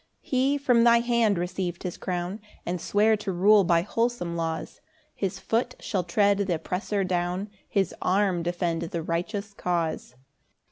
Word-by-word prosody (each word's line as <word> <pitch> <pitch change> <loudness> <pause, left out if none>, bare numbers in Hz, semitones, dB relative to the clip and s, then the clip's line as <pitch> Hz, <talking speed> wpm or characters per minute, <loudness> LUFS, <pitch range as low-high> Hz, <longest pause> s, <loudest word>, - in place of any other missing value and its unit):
3 - - -23
He 265 +2 +2
from 245 -4 +3
thy 235 0 +6
hand 235 -4 +2
receiv'd 175 0 -3
his 180 - -4
crown, 180 +3 -4 0.2
And 175 -1 -3
sware 215 +2 +3
to 210 -2 -3
rule 200 +3 +5
by 170 -1 +3
wholesome 230 -5 -1
laws 165 -1 -4 0.3
His 195 -3 -3
foot 245 +2 -1
shall 190 -4 -2
tread 200 +3 +2
th' 200 -1 -1
oppressor 180 +4 -1
down, 180 +2 -2 0.2
His 195 -4 +1
arm 190 -2 +2
defend 175 -1 -1
the 170 0 -3
righteous 200 +5 -3
cause. 170 -9 -2
190 Hz, 155 wpm, -26 LUFS, 175-215 Hz, 0.3 s, thy